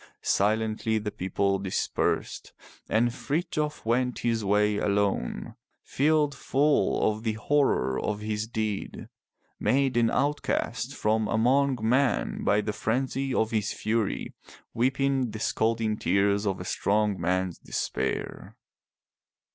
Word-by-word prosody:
Silently 110 +2 +1
the 105 -1 -3
people 95 +1 0
dispersed, 95 -1 -2 0.4
and 115 +2 +2
Frithjof 150 0 -2
went 125 +2 +1
his 115 -2 0
way 105 +1 +2
alone, 100 -10 -1 0.3
filled 150 0 +2
full 145 +2 +2
of 110 +1 -6
the 110 -1 -1
horror 110 - +1
of 105 -1 -2
his 105 0 -2
deed, 110 -3 -4 0.5
made 130 +4 +2
an 115 -1 +3
outcast 140 -3 -1
from 110 0 +1
among 130 +4 +2
men 125 +4 +1
by 105 +1 +3
the 105 0 -3
frenzy 130 +4 -1
of 110 -3 +1
his 110 -1 0
fury, 110 -1 -2 0.4
weeping 130 +1 +1
the 110 0 -7
scalding 110 0 0
tears 100 +3 +1
of 95 - -1
a 90 - -6
strong 105 0 0
man's 90 0 -1
despair. - - -4
110 Hz, 120 wpm, -27 LUFS, 105-130 Hz, 0.5 s, an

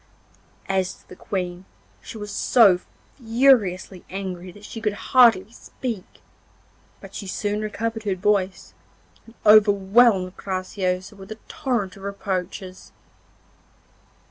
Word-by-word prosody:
As 190 -1 0
to - - -25
the - - -11
Queen, 180 -1 -4 0.4
she - - -9
was 210 -1 -7
so 200 -4 +5 0.4
furiously 225 -7 +2
angry 185 -1 -6
that 205 +3 -14
she 225 - -8
could 210 -2 0 0.2
hardly 225 -6 +6
speak; 230 -4 -7 0.8
but - - -13
she 200 - -7
soon 205 +2 -2
recovered 225 +1 -3
her 200 -3 -1
voice, 195 0 -1 0.5
and 230 - -16
overwhelmed 205 -1 +5
Graciosa 185 0 -3
with 195 +1 -12
a 220 - -6
torrent 240 -10 -2
of - - -13
reproaches. 190 -2 -5
200 Hz, 115 wpm, -23 LUFS, 185-220 Hz, 0.8 s, hardly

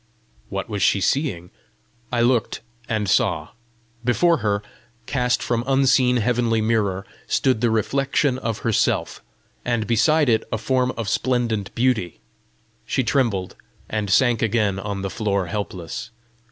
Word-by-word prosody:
What 100 -1 -4
was 105 -3 -4
she 100 - +3
seeing? 95 - -1 0.6
I 120 -1 +1
looked, 120 -2 +1 0.3
and 110 -2 -1
saw: - - +1 0.5
before 165 +8 +3
her, 105 -4 -1 0.4
cast 125 -1 0
from 120 -1 0
unseen 130 -2 +3
heavenly 120 0 +1
mirror, 105 -4 0 0.2
stood 130 -5 +1
the 120 - +3
reflection 135 +4 +1
of 115 -4 -2
herself, 115 -2 0 0.4
and 120 -3 0
beside 150 +7 +3
it 110 -2 +3
a - - 0
form 125 +3 +1
of 115 -3 -3
splendent 115 -2 0
beauty, 115 -8 0 0.6
She 130 - -1
trembled, 115 -8 0 0.3
and 105 -2 -2
sank 120 +2 +3
again 105 -3 +1
on 100 -1 -4
the 95 - -3
floor 100 -4 -1
helpless. 90 0 -5
115 Hz, 135 wpm, -22 LUFS, 100-125 Hz, 0.6 s, she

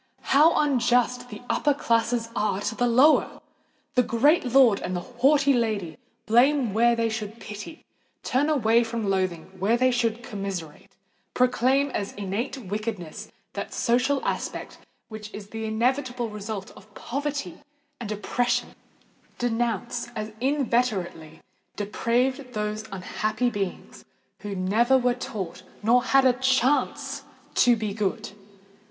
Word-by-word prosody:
how 305 +4 +6
unjust 245 -3 +2
the 210 +2 -9
upper 290 +2 +1
classes 230 -2 0
are 205 -3 0
to 205 - -2
the 245 +2 +1
lower! 260 +6 +4 0.5
The 250 - +4
great 275 +8 +3
lord 250 -4 +5
and 185 - -4
the 175 - -2
haughty 275 +5 +3
lady 215 -9 -1 0.3
blame 245 0 +3
where 235 +2 +4
they 230 0 +1
should 220 0 -5
pity—turn 255 +4 -5
away 235 -6 +3
with 235 -1 -2
loathing 190 -5 -1
where 215 +6 +2
they 255 +1 +3
should 235 -1 0
commiserate—proclaim 210 - -2
as 200 -4 -3
innate 205 +7 -3
wickedness 210 -6 -5 0.2
that 200 - -5
social 255 +4 +1
aspect - - -4 0.3
which 215 -1 -8
is 205 -1 -9
the 225 0 -5
inevitable 245 +2 0
result 210 -1 -6
of 215 - -17
poverty 280 - -4 0.4
and 225 -3 -5
oppression—denounce 235 0 -3
as 215 0 -4
inveterately 235 - -1 0.3
depraved 245 +5 -1
those 210 0 -3
unhappy 215 +5 -1
beings 200 -4 -5 0.4
who 205 -1 -5
never 220 +8 +3
were 250 -1 +2
taught 190 -7 -6 0.2
nor 240 +3 +4
had 270 0 +4
a 255 - +6
chance 260 +2 +1 0.3
to 245 -1 +5
be 215 -2 -3
good! 215 +1 -2
230 Hz, 125 wpm, -25 LUFS, 210-250 Hz, 0.5 s, how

